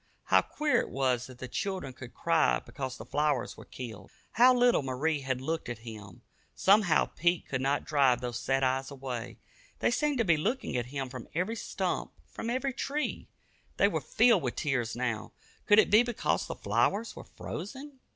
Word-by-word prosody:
How - - +5
queer 300 -1 +1
it - - -6
was 130 -2 0
that 130 -1 -12
the 130 - -6
children 185 - -3
should 125 -2 -10
cry 165 -2 +3
because 130 -2 -6
the - - -9
flowers 145 -4 0
were - - -12
killed! 115 -5 -8 0.2
How 245 +3 +6
little 245 -5 +4
Marie 140 +4 -1
had 130 -2 -2
looked 160 0 -3
at 120 -1 -7
him! 105 -5 -10 0.3
Somehow 195 -4 +4
Pete 175 +1 0
could 130 -1 -2
not 140 +2 0
drive 135 -5 +3
those 120 -1 -4
sad 135 +2 0
eyes 130 +1 +1
away. 130 -4 -6 0.4
They - - +1
seemed 295 -2 +1
to 230 - +2
be 170 -4 +4
looking 225 - -1
at 120 -1 -1
him 135 0 -4
from 125 -2 -8
every 185 +7 0
stump, 190 -4 -3
from 230 - -6
every 260 +2 -1
tree. 290 +3 -3 0.5
They - - +5
were - - -1
filled 230 -4 +4
with 125 -4 -2
tears 125 -5 -1
now 120 -3 -3 0.3
could 205 - +6
it 215 - +5
be 215 +2 +8
because 240 -2 -1
the - - -5
flowers 220 +3 0
were - - -8
frozen? 265 - -8
145 Hz, 190 wpm, -30 LUFS, 125-210 Hz, 0.5 s, be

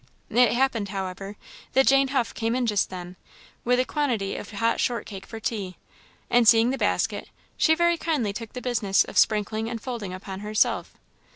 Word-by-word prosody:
It 240 0 +4
happened, 240 -5 +1
however, 195 +1 -5 0.4
that 265 0 +4
Jane 275 0 +5
Huff 260 -3 -1
came 230 +1 -1
in 255 -1 0
just 210 -3 +1
then, 180 0 -8 0.5
with 250 +1 +2
a 255 - +2
quantity 245 -11 -1
of - - -7
hot 230 +2 0
short 235 -4 -1
cake 195 -2 -9
for 225 - -7
tea; 200 -5 -4 0.5
and 240 -1 +3
seeing 230 +2 +6
the 270 - -2
basket, - - 0 0.3
she 320 - +4
very 345 +1 +2
kindly 265 -12 -1
took 220 +1 -7
the 250 - -7
business 215 -6 +2
of - - -11
sprinkling 215 +1 +1
and 230 -1 -4
folding 230 -6 -5
upon 190 +1 -7
herself. 210 +1 0
225 Hz, 185 wpm, -25 LUFS, 200-250 Hz, 0.5 s, seeing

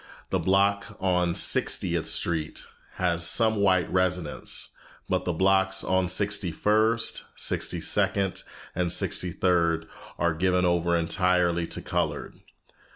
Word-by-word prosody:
The - - 0
block 100 +1 0
on 90 -2 0
Sixtieth - - +2
Street 80 -2 0 0.3
has 85 -2 -1
some 110 +5 +3
white 95 -3 +2
residents, 90 -4 -1 0.4
but 95 0 -1
the 90 - 0
blocks 95 +2 +2
on 95 -1 0
Sixty 100 -1 +1
first, 110 +6 +1
Sixty - - -1
second, 95 -2 0 0.3
and 90 -1 -1
Sixty 90 - +1
third 85 -2 0 0.3
are 85 -1 0
given 90 +2 0
over 85 -1 +1
entirely 85 0 0
to - - -3
colored. - - -4
90 Hz, 120 wpm, -25 LUFS, 85-95 Hz, 0.4 s, some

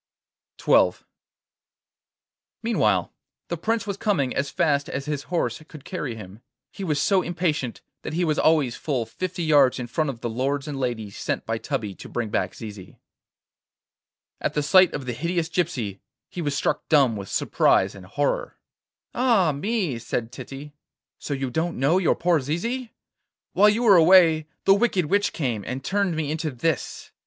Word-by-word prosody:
XII - - +4 1.7
Meanwhile 105 - +1 0.4
the 170 - -2
Prince 225 +7 -1
was 200 -2 -4
coming 165 - 0
as 140 +1 -1
fast 145 0 +1
as 140 +1 -4
his 150 -2 -3
horse 155 -8 -1
could 150 -4 -13
carry 150 -10 -4
him. 105 0 -11 0.3
He 195 - -7
was 150 -5 0
so 190 +5 +3
impatient 165 -8 -2 0.2
that - - -6
he 175 +2 +1
was 155 -1 0
always 150 -7 +3
full 130 -7 -2
fifty 185 +6 -4
yards 145 -5 +4
in 125 - -4
front 145 +6 -1
of 120 -4 -6
the 120 - -2
lords 135 +4 -1
and 145 -2 -4
ladies 110 -6 -3
sent - - -2
by - - -2
Tubby 105 -3 -3
to - - -11
bring 120 -3 -3
back - - -1
Zizi. 105 -4 -10 1.4
At - - -2
the 150 - +1
sight 185 +4 +6
of 140 - -5
the 125 - -3
hideous 170 +5 -1
gypsy 130 - -2 0.3
he 175 - -5
was 145 -3 -1
struck - - -1
dumb 140 -7 +4
with 100 -2 -7
surprise - - +2
and 95 -2 -12
horror. 145 +8 -1 0.6
'Ah 230 -10 +3
me!' 175 - -2
said 115 0 -3
Titty, 135 +3 -9 0.5
'so 145 - -3
you 135 -2 -3
don't 165 +4 -1
know 145 +8 +3
your 180 - +2
poor 175 -2 +2
Zizi? 225 - -3 0.6
While 210 +2 +6
you 220 +3 +1
were 205 -5 +7
away 165 -2 +6 0.2
the 195 - +7
wicked 200 -4 +2
witch 205 +6 +1
came, 120 -9 -2
and 130 +6 -5
turned 195 +1 0
me 155 -2 -2
into 160 0 -2
this. 145 +3 -3
150 Hz, 170 wpm, -24 LUFS, 125-180 Hz, 1.7 s, were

